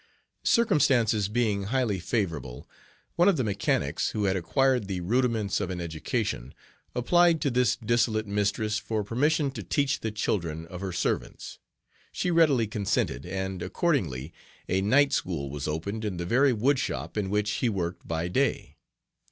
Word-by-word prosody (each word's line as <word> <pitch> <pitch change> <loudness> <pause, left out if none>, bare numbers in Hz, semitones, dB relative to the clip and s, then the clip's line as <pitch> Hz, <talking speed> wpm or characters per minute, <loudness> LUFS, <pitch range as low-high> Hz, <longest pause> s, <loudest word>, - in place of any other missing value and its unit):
Circumstances 130 - +3
being 105 -3 0
highly 115 -3 0
favorable, 85 - -3 0.5
one 175 +2 +5
of 190 - +2
the 130 - +1
mechanics, 105 -3 0
who 105 - -1
had 95 -1 +2
acquired 125 +5 +1
the 95 -2 -3
rudiments 115 0 0
of - - -2
an 90 -1 -4
education, 85 - -3 0.4
applied 170 +6 +4
to 140 - +1
this 125 -1 +2
dissolute 115 -1 +1
mistress 105 +1 0
for 110 -2 -2
permission 140 +7 +1
to - - -6
teach 145 -1 0
the 110 - -2
children 85 -7 -2
of 90 +2 -9
her 95 -1 -3
"servants." 85 - -3 0.5
She 180 - -1
readily 150 -8 +4
consented, 100 - -1
and, 95 0 -3
accordingly, 90 - -1 0.3
a 95 +1 +1
night 140 +8 +4
School 75 - -2
was 70 0 -4
opened 100 +8 -3
in 100 -4 -3
the 85 - -3
very 130 +8 +4
woodshop 125 +4 0
in 105 -3 -1
which 105 +1 0
he 105 +4 0
worked 90 -4 -4
by 80 +1 -2
day. 135 +10 -1
105 Hz, 155 wpm, -27 LUFS, 90-125 Hz, 0.5 s, one